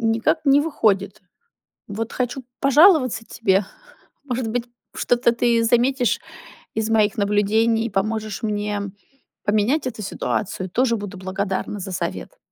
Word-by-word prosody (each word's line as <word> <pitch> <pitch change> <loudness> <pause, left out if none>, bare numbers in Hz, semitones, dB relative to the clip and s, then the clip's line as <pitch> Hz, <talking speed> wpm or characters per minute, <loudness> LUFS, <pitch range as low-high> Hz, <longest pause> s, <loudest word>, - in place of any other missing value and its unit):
никак 225 +8 +1
не 280 0 +5
выходит. 205 - 0 0.7
Вот 220 +2 -4
хочу 250 +1 -2 0.2
пожаловаться 275 - +5
тебе. 195 -3 +1 0.6
Может 250 -4 -2
быть, 240 +1 -2 0.3
что-то 240 -1 +2
ты 235 -1 +2
заметишь 245 +2 +2 0.6
из 220 0 -1
моих 215 -2 +3
наблюдений, 215 +3 +2
и 230 - -5
поможешь 215 +2 -2
мне 210 -1 -2 0.6
поменять 215 +9 +1
эту 230 -4 -4
ситуацию. 190 -1 -3
Тоже 240 +2 +2
буду 205 -2 -7
благодарна 190 +2 -3
за 190 0 -6
совет. - - -4
225 Hz, 125 wpm, -22 LUFS, 205-245 Hz, 0.7 s, не